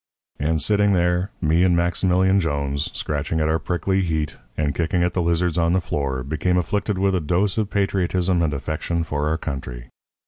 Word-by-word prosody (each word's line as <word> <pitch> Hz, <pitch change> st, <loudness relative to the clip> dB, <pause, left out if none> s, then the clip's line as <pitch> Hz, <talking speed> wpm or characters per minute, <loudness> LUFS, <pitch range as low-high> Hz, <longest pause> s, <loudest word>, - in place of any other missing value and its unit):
"And 80 Hz, +2 st, +1 dB
sitting 100 Hz, +5 st, +3 dB
there 90 Hz, +1 st, +1 dB
me 85 Hz, +1 st, +3 dB
and 90 Hz, -2 st, +3 dB
Maximilian 95 Hz, +2 st, +2 dB
Jones, 70 Hz, -3 st, -1 dB
scratching 75 Hz, +2 st, -2 dB
at 75 Hz, -, +1 dB
our 80 Hz, +1 st, +1 dB
prickly 95 Hz, +3 st, 0 dB
heat 80 Hz, -5 st, -1 dB, 0.2 s
and 75 Hz, -1 st, 0 dB
kicking 85 Hz, +4 st, 0 dB
at 90 Hz, 0 st, 0 dB
the 90 Hz, -, 0 dB
lizards 85 Hz, 0 st, +1 dB
on 85 Hz, +1 st, +2 dB
the 95 Hz, -, +3 dB
floor, 70 Hz, -6 st, -2 dB
became 80 Hz, +6 st, 0 dB
afflicted 100 Hz, +3 st, -1 dB
with 95 Hz, +1 st, +2 dB
a 90 Hz, -, +1 dB
dose 90 Hz, +6 st, +1 dB
of 105 Hz, -2 st, -1 dB
patriotism 95 Hz, -3 st, +1 dB
and 80 Hz, -3 st, +1 dB
affection 80 Hz, +4 st, -2 dB
for 75 Hz, -2 st, -2 dB
our 80 Hz, -, 0 dB
country. 65 Hz, -5 st, -6 dB
85 Hz, 185 wpm, -22 LUFS, 75-95 Hz, 0.2 s, sitting